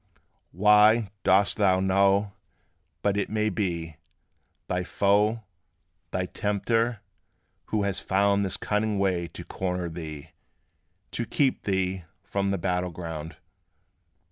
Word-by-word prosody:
How 105 +2 +6 0.2
dost 95 0 +3
thou 95 -3 +3
know 100 +1 +2 0.7
but 100 -1 +1
it 100 - -1
may 110 0 0
be 85 -5 -3 0.7
Thy 90 0 -1
foe, 105 +4 +2 0.7
thy 90 - -2
tempter, 115 +4 -1 0.6
who 105 -2 -1
has 100 -2 -1
found 100 +1 +2
This 95 - -1
cunning 105 0 -1
way 90 -3 0
to - - -9
corner 90 -2 -3
thee, 80 -2 -8 0.8
To 120 - -3
keep 135 -3 +1
thee 95 -2 -1 0.2
from 100 0 -1
the 100 - 0
battle 90 0 -1
ground? 80 -2 -7
100 Hz, 115 wpm, -26 LUFS, 90-105 Hz, 0.8 s, How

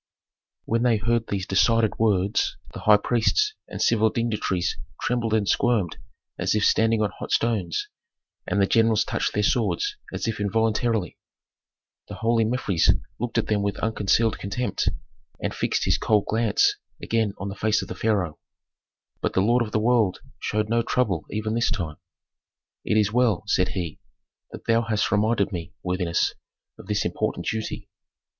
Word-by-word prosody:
When 115 +1 0
they 120 -2 +3
heard 115 +2 0
these 95 -2 -2
decided 110 +3 +2
words, 100 -2 +1 0.2
the - - -7
high 105 -1 +6
priests 120 - +1
and - - -7
civil 110 -1 +3
dignitaries 105 -6 -1 0.2
trembled 120 -2 -1
and 105 -2 +1
squirmed 110 -9 +1 0.4
as - - +1
if 105 - +2
standing 110 -1 +3
on 105 - 0
hot - - -6
stones, 105 -8 0 0.6
and 95 +3 0
the 100 - +5
generals 110 0 +3
touched - - -2
their 105 - +1
swords 270 - 0
as - - -3
if 115 -2 -2
involuntarily. 110 -1 0 0.9
The - - -7
holy 115 0 +2
Mefres 110 -7 +1 0.3
looked 120 0 -3
at - - +2
them 105 -1 0
with 100 0 -1
unconcealed 110 +1 +1
contempt, 105 +6 -1 0.5
and - - -2
fixed - - -1
his - - +2
cold 105 -2 +2
glance 110 -1 +2 0.2
again 110 -3 0
on 100 - -4
the 100 - -6
face 110 +1 +1
of - - -8
the - - -5
pharaoh. 95 -9 -1 0.8
But - - -1
the 95 - +3
lord 120 +5 +3
of 105 - -7
the 110 - +1
world 110 -4 +2 0.2
showed 105 0 -1
no 115 +1 +2
trouble 105 -9 0
even 110 +1 -2
this 115 +1 +1
time. 85 -6 -3 0.9
"It 110 - +1
is 105 -1 +2
well," 115 -7 +2
said 90 -3 +2
he, 85 -4 -4 0.5
"that - - -10
thou 115 0 +3
hast 110 -2 0
reminded 105 -1 +2
me, 85 0 -6
worthiness, 90 -2 0 0.5
of - - -12
this - - 0
important - - -2
duty. 110 -1 -3
110 Hz, 165 wpm, -24 LUFS, 100-115 Hz, 0.9 s, high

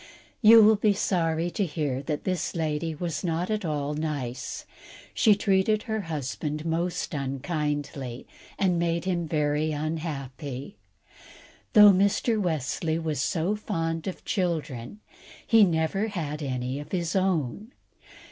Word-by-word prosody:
You 225 0 +9
will 215 0 +6
be 210 0 +3
sorry 170 -3 0
to 205 - -1
hear 150 -6 -2
that 150 +1 -3
this 185 -3 -2
lady 160 0 -1
was 165 -1 -3
not 175 +3 -1
at 215 -1 -1
all 150 -3 -2
nice; 140 -4 -4 0.5
she 215 -4 +5
treated 205 +1 +2
her 220 -1 -2
husband 150 -1 -4
most 170 +2 -1
unkindly, 140 -2 -3 0.3
and 180 -3 +2
made 170 0 0
him 175 -3 -1
very 150 0 0
unhappy. 145 -1 -5 1.0
Though 210 -3 +9
Mr. 200 +3 +2
Wesley 160 -1 -1
was 155 -4 -2
so 175 +6 0
fond 165 -6 -3
of 185 - -6
children, 170 - -2 0.4
he 225 -2 +6
never 175 +4 +1
had 160 -7 -4
any 130 -1 -3
of 145 - -9
his 175 -1 -1
own. 190 - 0
165 Hz, 130 wpm, -27 LUFS, 150-190 Hz, 1.0 s, You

